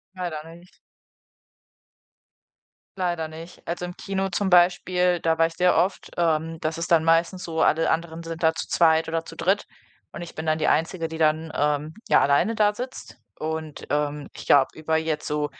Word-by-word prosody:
Leider 170 -4 -4
nicht. 175 +2 -19 2.2
Leider 175 -3 -1
nicht. 165 +2 -11
Also 175 +1 -3
im 180 0 -7
Kino 195 0 -2
zum 190 +2 -1
Beispiel, 180 0 +3
da 165 0 +1
war 165 - +4
ich 165 - -3
sehr 180 +2 +3
oft. 190 +2 0
Ähm. 165 -1 0
Das 160 +1 -2
ist 170 - -4
dann 165 -2 +5
meistens 165 +3 +2
so, 160 -1 -2
alle 165 +1 +3
anderen 165 0 -3
sind 165 0 -7
da 160 -1 +3
zu - - -4
zweit 160 -1 +3
oder 165 0 -2
zu - - -11
dritt, 195 +3 +1 0.5
und 175 - -6
ich 170 - -10
bin 160 0 -6
dann 155 0 +2
die 160 - 0
Einzige, 165 +1 +1
die 160 0 -7
dann, 155 0 +1
ähm, 150 +1 0 0.2
ja - - +6
alleine 145 +11 +2
da 210 -1 +3
sitzt. 250 +4 -8 0.2
Und, 160 -1 -5
ähm, 145 0 -1
ich - - -10
glaube 135 -2 +5
über 160 0 -1
jetzt 160 -1 -2
so 150 0 -1
165 Hz, 190 wpm, -24 LUFS, 160-175 Hz, 2.2 s, ja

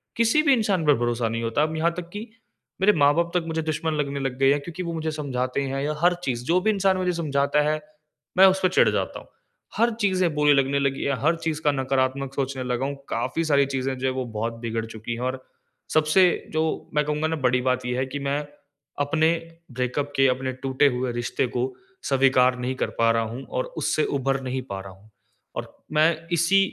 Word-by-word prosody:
किसी 230 +7 +3
भी 280 -3 +5
इंसान 200 -8 +1
पर 145 - +6
भरोसा 120 -1 0
नहीं 115 +1 -3
होता, 115 +6 +1
अब 155 +1 -1
यहाँ 170 +2 +2
तक 175 -1 -6
कि 205 - -5 0.6
मेरे 210 +2 +5
माँ-बाप 165 +4 +3
तक 170 - -1
मुझे 160 0 -1
दुश्मन 155 0 -2
लगने 140 -2 -2
लग 135 -2 -3
गए 135 0 +5
हैं 145 - +2
क्योंकि 170 +4 -6
वो 170 -1 -4
मुझे 160 -1 -2
समझाते 135 -3 -2
हैं 135 0 -2
या 150 +1 -1
हर 175 +1 +5
चीज़ 120 -2 -2
जो 175 +4 +3
भी 220 - +1
इंसान 195 -2 +2
मुझे 180 -1 0
समझाता 145 -2 +1
है, 155 0 -1 0.6
मैं 190 - +9
उसपे 190 -1 +3
चिढ़ - - +4
जाता - - -2
हूँ। - - -16 0.5
हर 235 +1 +3
चीज़ें 185 -5 +2
बुरी 150 -1 +4
लगने 140 0 +2
लगी 135 -1 -1
है, 140 - -1
हर 160 +3 +3
चीज़ 160 -1 -3
का 145 - +3
नकारात्मक 135 0 -1
सोचने 135 -1 -2
लगा 125 +1 -1
हूँ, 140 0 -3
काफ़ी 140 +8 -1
सारी 140 -2 +4
चीज़ें 135 -1 -2
जो 130 +1 -1
है 130 - 0
वो 130 -1 -3
बहुत 115 +2 -1
बिगड़ 115 -1 -3
चुकी 115 +1 -6
है। - - -7
और 130 +1 -3 0.5
सबसे 155 +4 +5 0.3
जो 160 0 -1
मैं 150 0 +2
कहूँगा 150 +1 0
ना 160 - -1
बड़ी 125 0 +2
बात 125 0 -2
ये 125 0 -1
है 130 - 0
कि 140 +2 -5
मैं 145 +1 0 0.6
अपने 160 +3 +2 0.4
ब्रेकअप 130 +3 -2
के 135 0 +5
अपने 130 0 0
टूटे 135 +2 +3
हुए 125 0 -1
रिश्ते 120 +2 -1
को 130 +2 -1 0.3
स्वीकार 130 -2 +3
नहीं 125 +1 -2
कर - - -1
पा 115 0 +4
रहा 115 0 +1
हूँ 120 +5 -6
और - - 0
उससे 155 - +1
उभर 135 0 0
नहीं 130 0 -2
पा 100 -1 -4
रहा 95 0 -10
हूँ। 100 +3 -21 0.5
और - - -6 0.2
मैं 160 +2 +2
इसी 170 +4 +4
140 Hz, 220 wpm, -24 LUFS, 130-160 Hz, 0.6 s, मैं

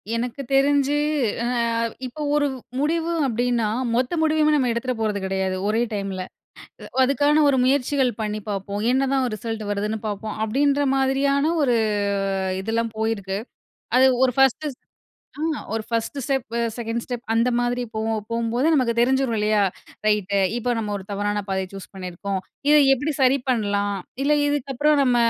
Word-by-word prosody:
எனக்கு 245 +3 -3
தெரிஞ்சு 280 +1 +3 0.5
ஆ - - 0 0.6
இப்போ 255 +5 -7
ஒரு 295 -1 +3 0.3
முடிவு 325 +3 0 0.2
அப்படீன்னா 240 -1 0 0.3
மொத்த 250 +5 0
முடிவுமே 310 -1 +3
நம்ம 260 -4 +2
எடுத்துற 255 +2 -2
போறது 215 -2 0
கிடையாது 190 0 -1
ஒரே 220 +2 +1
டைம்ல. 195 -2 -3 0.8
அதுக்கான 285 +3 +3
ஒரு 270 - +2
முயற்சிகள் 265 0 +2
பண்ணி 210 0 -2
பார்ப்போம், 200 0 -3
என்னதான் 265 +1 +2
ஒரு 230 - -4
ரிசல்ட் 225 0 -4
வருதுன்னு 210 +2 -1
பார்ப்போம், 210 +1 -4
அப்படீன்ற 280 +6 +2
மாதிரியான 275 +3 +2
ஒரு 245 -3 +3 0.9
இதெல்லாம் 225 +2 -1
போயிருக்கு. 210 -3 -1 0.6
அது 260 - +6 0.2
ஒரு 255 -1 +3
ஃபர்ஸ்ட்டு 270 +3 +3 0.7
ஆ - - -4 0.3
ஒரு 225 - -1
1 230 +4 -2
ஸ்டெப், 265 -5 -2 0.2
2 235 0 -3
ஸ்டெப் 245 -1 -5
அந்த 230 +2 +3
மாதிரி 245 0 0
போகும். 220 0 -1
போகும்போது 235 +3 0
நமக்கு 255 -5 +2
தெரிஞ்சிரும். 260 0 +2
இல்லையா? 210 0 +2 0.4
ரைட்டு 205 -2 +2 0.2
இப்போ 240 +1 -1
நம்ம 210 -2 -3
ஒரு 195 - -8
தவறான 205 +1 -1
பாதைய 190 -1 -1
சூஸ் 195 -1 -9
பண்ணியிருக்கிறோம். 190 +1 -4 0.3
இத 300 - +7 0.2
எப்படி 290 +4 -2
சரி 260 +1 +4
பண்ணலாம்? 205 -4 0 0.3
இல்ல, 300 +1 +4
இதுக்கப்புறம் 290 +1 +1
நம்ம 250 -2 +3
240 Hz, 145 wpm, -23 LUFS, 210-275 Hz, 0.9 s, இத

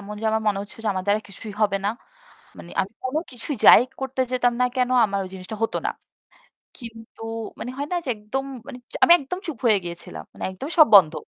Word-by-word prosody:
এমন 205 +1 -8
যে - - -6
আমার 220 0 0
মনে 205 -2 +2
হচ্ছে 205 - -12
যে - - +1
আমার 185 -1 -3
দ্বারা 205 +1 +2
কিছুই 205 +2 -9
হবে 200 -2 +3
না। - - +2 0.7
মানে 170 - -11
আমি 190 - -4
কোনো 260 +4 0
কিছুই 255 +3 -5
যাই - - +10 0.2
করতে 265 0 -3
যেতাম 245 -1 +2
না - - +5
কেনো 255 -1 +1
আমার 200 -2 -1
ওই - - -7
জিনিসটা 185 +3 -7
হতো 225 - 0
না। - - 0 0.9
কিন্তু 225 -2 -11 0.4
মানে 245 - -5
হয় 285 +1 -3
না - - +1
যে - - -7
একদম 215 +6 -4 0.2
মানে 250 - -8 0.2
আমি 340 - +8
একদম 290 +5 -5
চুপ 315 -8 -5
হয়ে 220 -3 +5
গিয়েছিলাম, 170 - -8
মানে - - -12
একদমই 270 - -7
সব 310 - +9
বন্ধ। 180 -6 +8
225 Hz, 220 wpm, -23 LUFS, 200-255 Hz, 0.9 s, যাই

